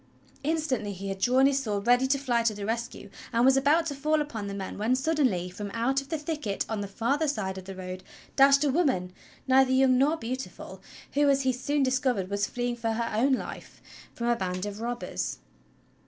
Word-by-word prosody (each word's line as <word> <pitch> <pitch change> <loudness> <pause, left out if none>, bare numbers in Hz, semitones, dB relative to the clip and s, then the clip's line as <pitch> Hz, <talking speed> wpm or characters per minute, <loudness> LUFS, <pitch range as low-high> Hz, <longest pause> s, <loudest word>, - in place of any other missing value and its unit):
Instantly 280 -9 -1
he 195 +1 -6
had 195 0 -4
drawn 255 +5 +4
his 275 0 +3
sword 205 -4 -3
ready 245 +2 +4
to 275 +1 +2
fly 250 -4 +1
to 230 -2 +1
the 200 -1 -5
rescue, 230 +2 -4 0.2
and 235 0 +3
was 265 0 +6
about 290 +5 +3
to 305 - -2
fall 305 +3 +1
upon 230 -9 -4
the 200 - -5
men 195 0 -6
when 225 +4 +2
suddenly, 260 - +1
from 200 +2 -6
out 240 +4 0
the 275 +4 -1
thicket 295 -9 -3
on 220 -2 -3
the 200 - -4
farther 265 +10 0
side 205 -9 -2
of 185 - -12
the 195 0 -7
road 185 0 -6 0.3
dashed 275 +1 +6
a 290 - +2
woman, 255 - +1 0.3
neither 265 0 +5
young 260 -1 +4
nor 300 +4 +3
beautiful, 255 0 -6 0.3
who, 285 0 +3
as 275 0 +3
he 260 -1 +2
soon 285 +3 0
discovered, 255 -7 0
was 200 0 0
fleeing 245 0 -2
for 230 -1 -2
her 230 +2 0
life 260 - -3 0.4
from 235 - -4
a 240 0 +3
band 185 -2 -3
of 205 +1 -6
robbers. 240 +1 -3
250 Hz, 205 wpm, -27 LUFS, 205-275 Hz, 0.4 s, was